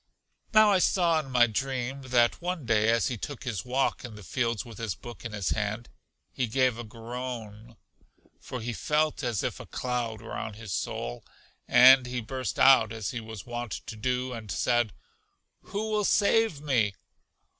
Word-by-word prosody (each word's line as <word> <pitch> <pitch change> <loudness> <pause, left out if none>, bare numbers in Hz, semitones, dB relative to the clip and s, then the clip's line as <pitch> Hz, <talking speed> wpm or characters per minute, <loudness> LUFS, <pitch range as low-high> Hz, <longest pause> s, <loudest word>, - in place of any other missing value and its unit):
Now 215 -2 +6
I 190 - +4
saw, 170 -3 +3
in 145 -3 -6
my 125 -2 +5
dream, 130 +3 -3
that 125 0 +2
one 175 -5 -3
day 110 -1 +3
as 115 +2 +2
he 120 -4 -4
took 145 +3 -6
his 120 -7 -3
walk 130 +2 0
in 120 -3 -8
the 105 - -11
fields 115 +1 -1
with 115 -4 -11
his 110 -6 -3
book 120 -1 -11
in 115 - -5
his 100 -3 -1
hand, 110 +2 -2 0.4
he 125 - -1
gave 125 0 +1
a - - -4
groan, 115 -1 -7 0.6
for 125 - -6
he 120 +1 -3
felt 150 +6 0
as 120 -5 -1
if - - -3
a - - -9
cloud 120 -3 -3
were - - -8
on 105 - -5
his 110 -3 -7
soul, - - -4 0.4
and 130 +1 +8
he 125 0 -3
burst 120 -4 -4
out 130 -5 +6
as 110 -4 -4
he 120 - -4
was 110 -3 -9
wont 120 -1 -5
to 110 - -7
do, 125 +3 -1
and 110 -3 -8
said, 120 +3 +1 0.7
Who 215 +2 -3
will 210 -1 +1
save 205 -5 +3
me? 115 -9 +1
120 Hz, 185 wpm, -28 LUFS, 110-130 Hz, 0.7 s, and